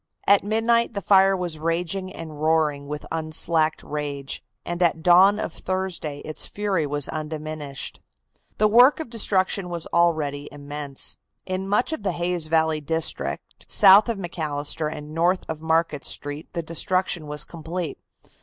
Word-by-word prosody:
At 200 0 +5
midnight 225 +2 +1
the - - 0
fire 195 -1 +5
was 175 -4 -3
raging 175 +4 -2
and 155 -4 -9
roaring 155 -3 +1
with 150 0 -6
unslacked 155 0 0
rage, 145 -2 -4 0.2
and 175 +1 -4
at 165 -2 +2
dawn 185 +3 +6
of 170 - -4
Thursday 185 -6 -4
its 155 - -5
fury 195 -7 -1
was 145 -1 -1
undiminished. 155 -2 -5 0.6
The 215 - +4
work 245 +8 +6
of 315 -7 -6
destruction 195 -4 +2
was 170 -2 -3
already 155 -4 +1
immense. 145 -1 -4 0.3
In 190 +1 -3
much 245 +9 +1
of 315 - -4
the 195 -3 -1
Hayes 175 -2 -1
Valley 160 -1 +1
district, 160 +2 -2
south 200 +3 +7
of 230 - -1
McAllister 155 -3 -2
and 150 -1 -8
north 175 +3 +1
of 160 -1 -5
Market 160 -2 0
Street, 145 +2 -1
the 170 -2 -3
destruction 170 0 0
was 150 0 -2
complete. 165 -1 -6
165 Hz, 150 wpm, -24 LUFS, 150-190 Hz, 0.6 s, south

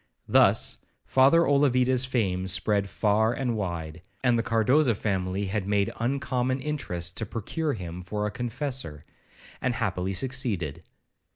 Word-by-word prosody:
Thus - - +4 0.3
Father 135 +6 +5
Olavida's 130 -3 +3
fame 95 -8 -1
spread 100 +2 +1
far 110 +3 +2
and 125 -2 -1
wide, 85 -5 -4 0.2
and 125 -2 +4
the 115 - +2
Cardoza 115 +3 +3
family 95 -1 -1
had 100 0 -2
made 100 -1 +1
uncommon 130 +1 -1
interest 90 - -3
to 115 - -1
procure 145 - -2
him 90 -3 -6
for 105 +3 -3
a 105 - -2
Confessor, 120 - -4 0.6
and 130 -2 0
happily 95 -4 -1
succeeded. 100 - -2
110 Hz, 130 wpm, -27 LUFS, 95-130 Hz, 0.6 s, Father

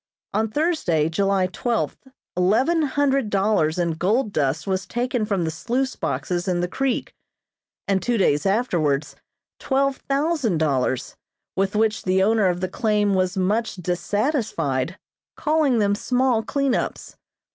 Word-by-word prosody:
On 220 +2 +1
Thursday, 215 - +1
July 195 +2 +1
twelfth, 230 +8 -2 0.3
eleven 225 - +2
hundred 275 -4 +1
dollars 195 -6 +1
in 170 -1 +1
gold 205 +7 0
dust 145 +1 0
was 190 -1 -2
taken 240 -1 -1
from 200 -5 0
the 160 - -1
sluice 250 +10 -2
boxes 175 +1 -2
in 180 -1 +1
the 175 - 0
creek, 265 +6 -2 0.7
and 195 -1 +1
two 240 -1 0
days 150 -3 +2
afterwards 170 - 0 0.4
twelve 275 0 +1
thousand 275 - 0
dollars, 135 -4 0 0.4
with 195 +1 0
which 215 -1 +1
the 190 0 +2
owner 215 -1 +3
of 180 0 -1
the 185 - 0
claim 210 0 +1
was 185 +1 0
much 210 +5 0
dissatisfied, 205 - -1 0.4
calling 305 -5 +2
them 205 -2 +2
small 250 +2 +1
clean 275 +2 0
ups. - - -3
205 Hz, 140 wpm, -23 LUFS, 180-250 Hz, 0.7 s, owner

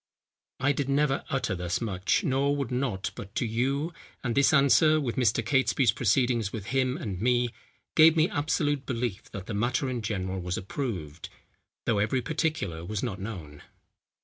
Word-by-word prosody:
I 135 +2 +3
did 140 -1 -2
never 140 0 +2
utter 130 -7 -1
thus 90 -1 -2
much, 100 - 0
nor 140 -2 +1
would 140 -4 -3
not 125 -7 -1
but 100 +2 -10
to - - 0
you; 135 +8 -1 0.3
and 120 -3 -1
this 140 +1 +4
answer, 150 +2 +5
with 125 -6 -2
Mr. 120 -2 +2
Catesby's 130 -2 +3
proceedings 115 0 +1
with 105 -4 -6
him 130 -1 +1
and 100 -5 -5
me, 120 0 +2 0.5
gave 160 +1 +7
me 160 +1 +5
absolute 145 -2 -1
belief 115 -4 -3
that 95 -3 -7
the 110 - -5
matter 125 +5 0
in 120 -2 -3
general 95 -3 -3
was 90 0 -3
approved, 90 - -5 0.6
though 110 -3 +2
every 115 +5 +1
particular 150 - -2
was 100 +3 -3
not 110 -7 -3
known." 90 -8 -7
120 Hz, 170 wpm, -28 LUFS, 100-140 Hz, 0.6 s, gave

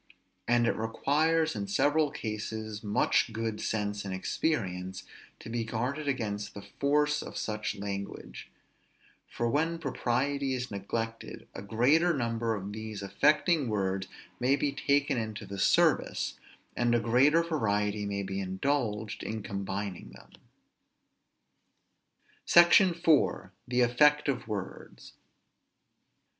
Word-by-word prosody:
And 120 0 +3
it 115 - +1
requires 155 +8 +1
in 200 - -3
several 155 -6 +2
cases 110 -2 -5
much 105 +2 +2
good 110 -1 -3
sense 105 -1 -2
and 100 - -5
experience 95 - -2 0.3
to - - -12
be 115 0 -2
guarded 125 +7 -3
against 105 -6 -2
the 100 - -8
force 150 +3 +1
of - - -8
such 105 0 -3
language; 100 0 -6 0.8
for 120 - -2
when 160 +7 0
propriety 135 -1 -1
is 125 -1 -4
neglected, 115 +3 -5
a - - -7
greater 140 - +3
number 115 -2 -1
of 100 0 -6
these 110 -1 -6
affecting 145 - +2
words 95 -2 -1 0.3
may 130 +3 +3
be 145 0 0
taken 140 -1 +1
into 110 -1 -5
the 100 0 -7
service, - - +2 0.4
and 120 0 +2
a - - +3
greater 130 +8 +4
variety 105 -9 -1
may 100 0 -2
be 95 0 -4
indulged 105 +2 -2
in 110 -1 -4
combining 100 -1 -4
them. - - -16 2.1
SECTION 175 +1 +6
IV. 165 -4 +2 0.2
THE 125 0 +1
EFFECT 150 +5 +4
OF 130 -5 -1
WORDS. 105 -4 -7
115 Hz, 125 wpm, -29 LUFS, 105-145 Hz, 2.1 s, SECTION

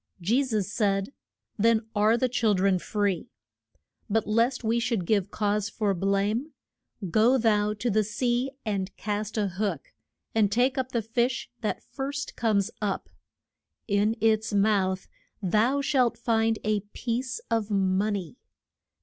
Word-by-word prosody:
Je 225 +10 +2
sus 215 -7 -1
said, 200 +1 0 0.5
Then 225 +1 +3
are 215 +3 +4
the 255 - +2
chil 230 -4 +2
dren 190 0 +2
free. 200 +3 -1 0.8
But 220 +1 +1
lest 235 +4 +1
we 230 +1 +1
should 230 -6 -1
give 200 -1 +1
cause 210 -1 0
for 205 -1 0
blame, 200 - 0 0.6
go 230 +7 +4
thou 210 -3 +2
to 215 +4 -3
the 215 +1 +3
sea, 240 +5 0 0.2
and 195 -3 -2
cast 210 +1 -3
a 210 -2 +1
hook, 185 -4 -3 0.4
and 210 -3 +3
take 250 +4 +2
up 260 -1 -2
the 235 -2 -1
fish 240 +3 -1
that 220 -3 -3
first 280 +1 -5
comes 215 -2 +1
up. 205 -2 -2 0.8
In 205 +1 +2
its 220 -1 +2
mouth 195 -2 +2 0.3
thou 220 +8 +2
shalt 255 -4 +2
find 225 -1 +1
a 215 -1 +1
piece 240 - -4
of 225 -2 0
mon 195 +1 +1
ey. 185 +1 -6
215 Hz, 145 wpm, -27 LUFS, 200-235 Hz, 0.8 s, are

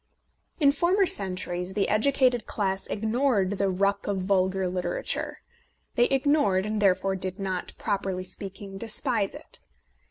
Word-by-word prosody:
In 285 -3 +6
former 350 +7 +3
centuries 185 - 0
the 200 - +2
educated 250 0 +2
class 195 -2 -2
ignored 220 -3 0
the 200 -1 +2
ruck 200 +2 0
of 195 -2 -1
vulgar 190 0 +1
literature. 180 -1 -3 0.6
They 240 - +4
ignored, 270 -9 +2
and 215 0 -2
therefore 195 0 +2
did 185 0 -4
not, 190 -2 -3
properly 195 -2 -2
speaking, 195 +1 -6
despise 225 -1 0
it. 300 - -5
200 Hz, 130 wpm, -27 LUFS, 190-240 Hz, 0.6 s, In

